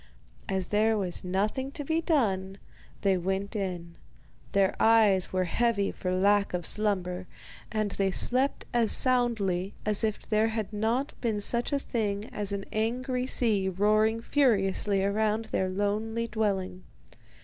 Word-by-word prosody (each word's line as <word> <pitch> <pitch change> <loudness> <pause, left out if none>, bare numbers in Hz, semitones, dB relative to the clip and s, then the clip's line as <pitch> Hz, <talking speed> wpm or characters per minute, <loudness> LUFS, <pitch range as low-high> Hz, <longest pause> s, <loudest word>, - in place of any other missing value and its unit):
As 190 -2 -2
there 215 +1 +2
was 185 -4 -3
nothing 210 +9 -1
to 290 -4 -5
be 320 +3 0
done, 195 - 0 0.4
they 195 -1 +2
went 190 +4 -3
in. 175 -4 -4 0.6
Their 195 -1 +2
eyes 215 -5 +4
were 185 0 +1
heavy 205 +2 0
for 180 - -4
lack 200 +1 +2
of 175 -2 -3
slumber, 185 -4 -1 0.4
and 215 -2 -1
they 195 -1 0
slept 255 +8 +1
as 235 -2 +2
soundly 215 -7 +1
as 210 +1 +2
if 215 -2 -2
there 215 0 +2
had 220 -2 -3
not 230 +7 -1
been 220 -4 0
such 235 +6 0
a 285 - +2
thing 210 -6 -2
as 205 -1 -4
an 200 -1 -3
angry 250 +3 -1
sea 210 -7 +2
roaring 215 +4 +2
furiously 200 -7 +2
around 215 +2 0
their 185 - 0
lonely 215 +4 -1
dwelling. 195 -4 -2
210 Hz, 145 wpm, -28 LUFS, 190-225 Hz, 0.6 s, eyes